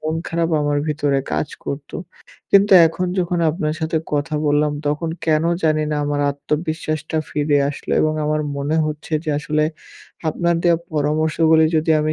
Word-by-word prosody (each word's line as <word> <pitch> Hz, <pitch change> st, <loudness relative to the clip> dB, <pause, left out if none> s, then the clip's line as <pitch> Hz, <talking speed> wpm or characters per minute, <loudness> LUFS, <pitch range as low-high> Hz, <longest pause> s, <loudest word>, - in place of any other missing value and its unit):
মন 155 Hz, +1 st, -2 dB
খারাপ 165 Hz, 0 st, 0 dB
আমার 145 Hz, 0 st, +1 dB
ভিতরে 145 Hz, -2 st, 0 dB
কাজ 150 Hz, -, -1 dB, 0.2 s
করতো। 140 Hz, 0 st, -5 dB, 0.5 s
কিন্তু 200 Hz, 0 st, +5 dB
এখন 180 Hz, +3 st, -2 dB
যখন 175 Hz, -1 st, 0 dB
আপনার 155 Hz, -1 st, -2 dB
সাথে 160 Hz, 0 st, 0 dB
কথা 150 Hz, +2 st, -1 dB
বললাম, 145 Hz, 0 st, +2 dB
তখন 150 Hz, +3 st, -1 dB, 0.2 s
কেনো 160 Hz, +1 st, +2 dB
জানি 155 Hz, -1 st, +2 dB
না 150 Hz, -, 0 dB
আমার 145 Hz, 0 st, -1 dB
আত্মবিশ্বাসটা 155 Hz, +2 st, -3 dB
ফিরে 145 Hz, -1 st, +1 dB
আসলো। 145 Hz, -, -6 dB
এবং 155 Hz, 0 st, +1 dB
আমার 155 Hz, 0 st, 0 dB, 0.2 s
মনে 145 Hz, +3 st, -1 dB
হচ্ছে 155 Hz, +1 st, -6 dB
যে 155 Hz, -, -1 dB
আসলে 150 Hz, 0 st, 0 dB, 0.6 s
আপনার 170 Hz, +2 st, 0 dB
দেয়া 170 Hz, -1 st, +4 dB, 0.2 s
পরামর্শগুলি 160 Hz, +2 st, +2 dB
যদি 160 Hz, +1 st, +1 dB
আমি 155 Hz, +1 st, 0 dB
155 Hz, 160 wpm, -20 LUFS, 150-160 Hz, 0.6 s, কিন্তু